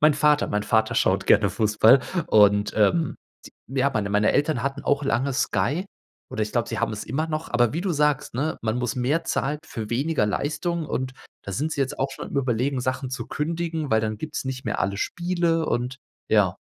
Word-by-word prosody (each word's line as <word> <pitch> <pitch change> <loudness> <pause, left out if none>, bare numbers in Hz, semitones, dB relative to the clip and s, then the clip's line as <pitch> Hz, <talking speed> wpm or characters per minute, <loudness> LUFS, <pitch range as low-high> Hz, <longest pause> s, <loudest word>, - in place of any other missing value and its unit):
mein 150 0 +5
Vater 150 0 +3
mein 105 0 0
Vater 110 0 +1
schaut - - +2
gerne - - +5
Fußball 110 +4 +4 0.3
und, 105 -1 +4
ähm, 135 +9 +2 0.3
t - - -12 0.2
ja, 135 +1 +1
meine 105 -5 -2
meine 105 +1 +3
Eltern 145 -4 +1
hatten 140 +1 -3
auch 140 0 +1
lange 135 +1 0
Sky, 130 - 0 0.5
oder 110 - -2
ich 105 - -3
glaube, 120 -1 0
sie - - -3
haben 115 -1 0
es 105 - -5
immer 145 +7 -2
noch, 155 0 -4
aber 120 -1 +2
wie 165 - -2
du 190 +1 -1
sagst, 150 -5 +1
ne: 145 +6 -1
„Man 110 +1 -1
muss 125 0 -1
mehr 145 +7 0
zahlen 145 0 -1
für 110 -2 -6
weniger 140 0 +1
Leistung“, 155 - -2
und 130 -1 -3 0.3
da 100 - -6
sind 150 +11 -1
sie 145 - -3
jetzt 135 -1 -1
auch 135 +1 0
schon 135 - -7
am - - -6
Überlegen, 130 0 0
Sachen 130 +1 -2
zu 130 - -4
kündigen, 165 -1 -3
weil 110 - +4
dann 110 -1 -3
gibt 155 -1 -6
es - - -2
nicht 130 -1 -5
mehr 110 - -2
alle 100 0 0
Spiele. 170 - 0
Und, 125 +2 -1 0.3
ja. - - +3
135 Hz, 215 wpm, -24 LUFS, 110-150 Hz, 0.5 s, mein